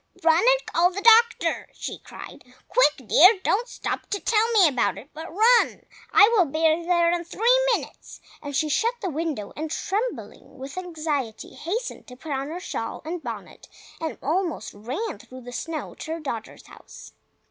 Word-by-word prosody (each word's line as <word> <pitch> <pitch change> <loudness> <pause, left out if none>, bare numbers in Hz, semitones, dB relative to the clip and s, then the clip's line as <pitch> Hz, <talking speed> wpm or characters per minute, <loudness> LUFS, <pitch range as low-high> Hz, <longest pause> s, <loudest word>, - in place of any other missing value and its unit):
"Run 325 -1 +5
and - - +3
call 345 +2 +2
the 380 +2 -5
doctor!" 465 +1 +4
she - - -6
cried. - - -11 0.2
"Quick, 300 - +2
dear! 370 - +7
Don't 470 +5 +1
stop - - -5
to 405 - -2
tell 450 +2 +2
me 395 -6 +6
about 260 -5 0
it, 280 - -12
but 320 +2 -8
run! 455 +6 +3 0.3
I 415 -1 +7
will 390 -6 +5
be 310 +1 -5
there 335 +2 +3
in 345 0 -1
three 470 +8 +2 0.2
minutes!" - - -9 0.2
And 285 -2 -6
she 305 +3 +1
shut 455 +11 +1
the 380 -6 -3
window, 300 -9 -4
and 310 +1 -4
trembling 425 +9 -4
with 270 +1 -8
anxiety, 310 -10 -4
hastened 445 +9 -5
to 250 - -11
put 300 +4 -9
on 270 0 -2
her 330 +4 -5
shawl 365 - -5
and 335 +2 -4
bonnet, 225 - -8 0.3
and 320 -1 -4
almost 340 +3 -2
ran 255 - -5
through 255 0 -12
the 245 0 -10
snow 310 +4 -5
to 320 - -6
her 330 - -5
daughter's 235 -8 -6
house. - - -14
330 Hz, 180 wpm, -24 LUFS, 290-410 Hz, 0.3 s, dear